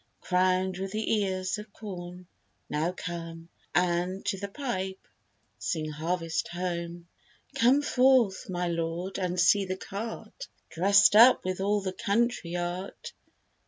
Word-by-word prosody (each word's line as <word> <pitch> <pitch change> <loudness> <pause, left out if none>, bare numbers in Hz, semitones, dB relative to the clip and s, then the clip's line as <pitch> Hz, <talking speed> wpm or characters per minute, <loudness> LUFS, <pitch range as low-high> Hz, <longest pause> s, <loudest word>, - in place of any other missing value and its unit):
Crown'd 185 0 +1
with 195 +1 -4
the 220 0 +1
ears 185 0 -2
of 210 0 -10
corn, 180 -4 -8 0.4
now 155 +4 -1
come, 165 -2 -7 0.3
And, 180 +2 +1
to 195 - -1
the 200 - -4
pipe, 190 -5 -4 0.5
sing 155 -3 -2
Harvest 165 +1 -2
Home. 170 -1 -4 0.5
Come 260 +5 +4
forth, 250 -9 +3
my 180 -1 -1
lord, 170 +3 -3
and 180 -1 -1
see 195 +3 +5
the 185 0 -3
cart 225 - -7 0.2
Drest 200 +6 +5
up 235 +1 +7
with 185 0 -2
all 205 +1 +1
the 190 -1 -3
country 205 -4 0
art. 175 +2 -5
185 Hz, 130 wpm, -28 LUFS, 175-200 Hz, 0.5 s, up